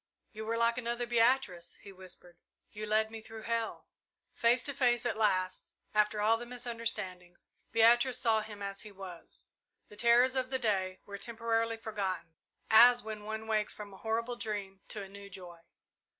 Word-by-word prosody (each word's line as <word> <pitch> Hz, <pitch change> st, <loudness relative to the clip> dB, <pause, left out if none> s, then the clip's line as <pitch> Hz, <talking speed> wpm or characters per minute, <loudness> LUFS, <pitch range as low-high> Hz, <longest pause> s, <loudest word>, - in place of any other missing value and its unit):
"You 220 Hz, -1 st, -7 dB
were 230 Hz, +1 st, 0 dB
like 235 Hz, +1 st, +2 dB
another 240 Hz, 0 st, -2 dB
Beatrice," 230 Hz, -7 st, +2 dB
he 200 Hz, -, -10 dB
whispered, 180 Hz, -2 st, -10 dB, 0.3 s
"you 215 Hz, +1 st, -6 dB
led 215 Hz, +1 st, +2 dB
me 225 Hz, -1 st, -7 dB
through 220 Hz, 0 st, -10 dB
hell!" 230 Hz, -1 st, -2 dB, 0.5 s
Face 235 Hz, +2 st, +4 dB
to 280 Hz, -, 0 dB
face 245 Hz, -2 st, +2 dB
at -, -, 0 dB
last, 185 Hz, -4 st, 0 dB, 0.2 s
after 210 Hz, 0 st, +2 dB
all 220 Hz, +2 st, +4 dB
the 240 Hz, -, -7 dB
misunderstandings, 230 Hz, -7 st, -4 dB, 0.3 s
Beatrice 240 Hz, +3 st, +5 dB
saw 220 Hz, -2 st, +3 dB
him 210 Hz, -1 st, -8 dB
as 200 Hz, 0 st, -5 dB
he 215 Hz, -, -9 dB
was. 190 Hz, -3 st, -11 dB, 0.4 s
The 210 Hz, -, -13 dB
terrors 240 Hz, +4 st, +5 dB
of 255 Hz, -1 st, 0 dB
the 260 Hz, -, 0 dB
day 190 Hz, -6 st, -1 dB
were 200 Hz, -1 st, -7 dB
temporarily 230 Hz, 0 st, -1 dB
forgotten, 190 Hz, -7 st, -3 dB, 0.4 s
as 240 Hz, +2 st, +8 dB
when 215 Hz, -1 st, -6 dB
one 220 Hz, +1 st, -4 dB
wakes 215 Hz, -1 st, 0 dB
from 205 Hz, -2 st, -9 dB
a -, -, -11 dB
horrible 230 Hz, +3 st, -2 dB
dream 200 Hz, -4 st, -4 dB
to 210 Hz, -, -4 dB
a -, -, -8 dB
new 200 Hz, +1 st, -11 dB
joy. 180 Hz, -3 st, -10 dB
220 Hz, 175 wpm, -32 LUFS, 200-235 Hz, 0.5 s, as